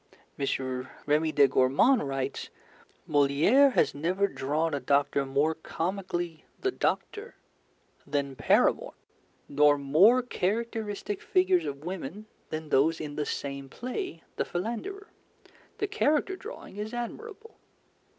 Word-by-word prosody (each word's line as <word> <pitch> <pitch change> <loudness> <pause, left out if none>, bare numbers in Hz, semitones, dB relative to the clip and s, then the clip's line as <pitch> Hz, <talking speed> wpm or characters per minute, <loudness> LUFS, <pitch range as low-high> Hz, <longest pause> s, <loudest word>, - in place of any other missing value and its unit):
M. 130 -2 -2 0.2
Remy 155 +2 +2
de 140 -2 +5
Gourmont 135 - +4
writes: 135 -1 -3 0.6
'Molière 155 - +4
has - - +3
never 180 +7 0
drawn 155 0 -1
a 145 - 0
doctor 140 0 +1
more 140 +4 +2
comically 175 0 -4 0.2
"the 390 - 0
doctor" 430 +4 -2 0.7
than 140 -2 -2
Paramore, - - +2 0.5
nor 145 0 +4
more 180 - +5
characteristic 215 -2 -2
figures 185 -3 +2
of 140 0 -6
women 185 +2 -6 0.2
than 155 -1 -5
those 155 +4 +3
in 150 -2 -6
the 150 -1 -2
same 140 -1 -4
play, 250 - -5
The - - 0
Philanderer. 240 - -4 0.7
The - - 0
character 345 -1 +1
drawing 420 - -10
is 215 +3 -5
admirable.'" 435 - -7
165 Hz, 120 wpm, -28 LUFS, 140-230 Hz, 0.7 s, de